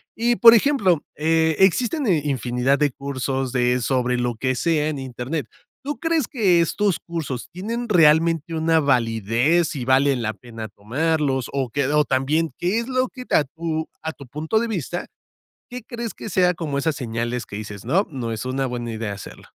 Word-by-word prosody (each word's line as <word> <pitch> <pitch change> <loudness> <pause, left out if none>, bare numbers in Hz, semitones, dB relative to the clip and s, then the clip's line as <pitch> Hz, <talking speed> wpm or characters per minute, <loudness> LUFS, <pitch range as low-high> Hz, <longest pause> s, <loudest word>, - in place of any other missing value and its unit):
Y, 235 +1 +1
por 230 -1 +9
ejemplo, 215 - +3
eh, 160 0 +2
existen, 245 - +2
eh, 170 -6 +3
infinidad 130 -1 0
de 145 -2 +2
cursos 135 -1 -3
de 125 0 +1
sobre 125 +1 0
lo 120 -1 -1
que 130 +3 -1
sea 155 +2 +1
en 150 -3 -3
Internet. 130 +2 -4 0.4
¿Tú 290 +1 -4
crees 325 -5 0
que 195 - +3
estos 195 +3 +1
cursos 155 -7 -5
tienen 230 +7 -4
realmente 165 -2 +4
una 160 0 +2
validez 125 - +1
y 130 - -3
valen 130 0 +3
la 110 -1 -1
pena 115 -1 -9
tomarlos? 135 +5 -1
¿O 135 -3 -1
qué? 140 +2 0
O 150 +1 +3
también, 150 +3 0
¿qué 185 +6 0
es 235 - -4
lo 255 -1 0
que 255 -2 -10
a 150 - +5
tu 160 +2 -4
a 160 0 -4
tu 140 - -12
punto 155 - -1
de 235 - -2
vista? 175 -3 -3 0.6
¿Qué 250 0 -6
crees 235 0 -5
que - - -8
sea 180 -2 +3
como 160 -5 -4
esas 155 +2 0
señales 120 -2 -3
que 100 - -7
dices, 105 -2 -7
no, 180 - +2
no 125 -6 -4
es 110 0 -4
una 130 +1 -1
buena 120 -2 -4
idea 110 -2 -4
hacerlo? 100 - -11
150 Hz, 185 wpm, -22 LUFS, 125-175 Hz, 0.6 s, por